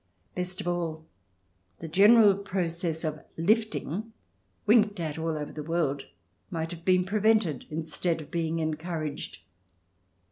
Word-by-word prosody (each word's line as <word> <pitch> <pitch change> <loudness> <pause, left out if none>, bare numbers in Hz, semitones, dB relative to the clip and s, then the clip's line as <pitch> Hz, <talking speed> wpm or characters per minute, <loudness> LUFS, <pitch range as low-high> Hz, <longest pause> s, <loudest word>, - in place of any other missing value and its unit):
Best 180 0 -4
of - - -6
all, 165 -3 -2 0.7
the - - -7
general 205 +5 +7
process 175 -4 -2
of 155 -1 -3
" - - -37
lifting," 220 -2 -1 0.5
winked 210 -2 +4
at 160 -2 -3
all 160 -1 -1
over 150 -1 -5
the 155 - -6
world, 150 -3 -1 0.4
might 165 -1 -3
have 170 -1 -8
been 185 0 +3
pre 210 +3 -1
vented, 210 - +2
instead 160 +2 -1
of 155 - -10
being 165 -1 -1
encouraged. 155 - -3
170 Hz, 140 wpm, -28 LUFS, 155-190 Hz, 0.7 s, general